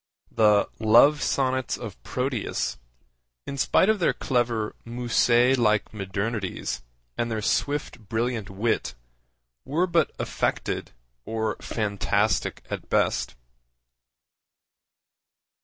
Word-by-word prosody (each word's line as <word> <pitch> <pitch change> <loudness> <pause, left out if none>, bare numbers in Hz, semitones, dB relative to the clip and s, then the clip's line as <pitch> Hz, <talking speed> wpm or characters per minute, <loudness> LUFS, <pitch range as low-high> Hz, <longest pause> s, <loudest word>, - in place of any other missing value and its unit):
The 105 -2 +4
Love 120 +7 +6
Sonnets 130 -2 0
of - - -8
Proteus, 125 - -2 0.7
in 140 - -5
spite 140 +7 +3
of 215 -1 +3
their 170 - +2
clever 120 -4 0
Musset 120 +1 +3
like 105 -3 +2
modernities 100 0 -3 0.4
and 120 - 0
their 110 -2 -2
swift 130 -6 -1
brilliant 115 -2 -1
wit, 100 - -1 0.7
were 160 +6 +1
but 170 -2 +2
affected - - -2 0.3
or 110 +2 -2
fantastic 105 0 -1
at - - -6
best. - - +1
115 Hz, 95 wpm, -25 LUFS, 105-130 Hz, 0.7 s, Love